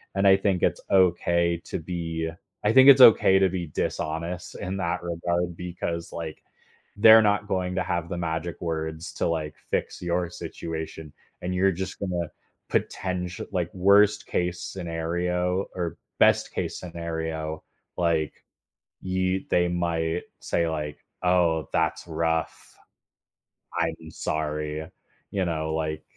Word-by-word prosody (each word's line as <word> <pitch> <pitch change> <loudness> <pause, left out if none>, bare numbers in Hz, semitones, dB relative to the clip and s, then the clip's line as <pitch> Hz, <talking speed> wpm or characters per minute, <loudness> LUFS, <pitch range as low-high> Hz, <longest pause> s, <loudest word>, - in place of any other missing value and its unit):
and 95 0 +3
I 95 0 +7
think 95 -2 0
it's - - +1
okay 85 -2 +3
to - - -4
be 80 -1 -3 0.3
I 105 - +3
think 130 +1 +9
it's 135 -1 +9
okay 95 -5 +8
to 95 - +4
be 90 -2 -3
dishonest 85 +4 -3
in 95 +2 -3
that 85 -3 -1
regard 85 0 -1
because, 85 -1 -4
like, 80 -2 -6 0.5
they're 110 +2 +9
not 105 -1 +2
going 90 -1 -1
to 95 - +2
have 85 -1 -2
the 85 - -4
magic 85 0 -3
words 80 0 -4
to, - - -1
like, 75 -2 -2 0.2
fix - - -2
your 90 0 0
situation, 80 -2 -6 0.3
and 90 +1 -2
you're 95 +1 +3
just 95 +2 -5
gonna 90 -4 -2 0.4
potential 90 -1 -2
like, 90 -3 -1
worst-case 100 -2 +3
scenario 90 +1 -2
or 85 -3 -3 0.2
best-case - - +2
scenario, 80 -2 -4 0.3
like, 85 -3 +1 0.7
you 95 0 0
they 90 0 +3
might 85 -1 -1 0.2
say 85 -1 0
like, 75 -2 -4 0.2
"Oh, 85 -4 +2
that's - - 0
rough. 80 -1 -2 1.0
I'm 80 -1 -2
sorry." 75 0 -3 0.4
You 95 -2 0
know, 80 -2 -2
like 80 -1 -2
85 Hz, 130 wpm, -26 LUFS, 80-90 Hz, 1.0 s, think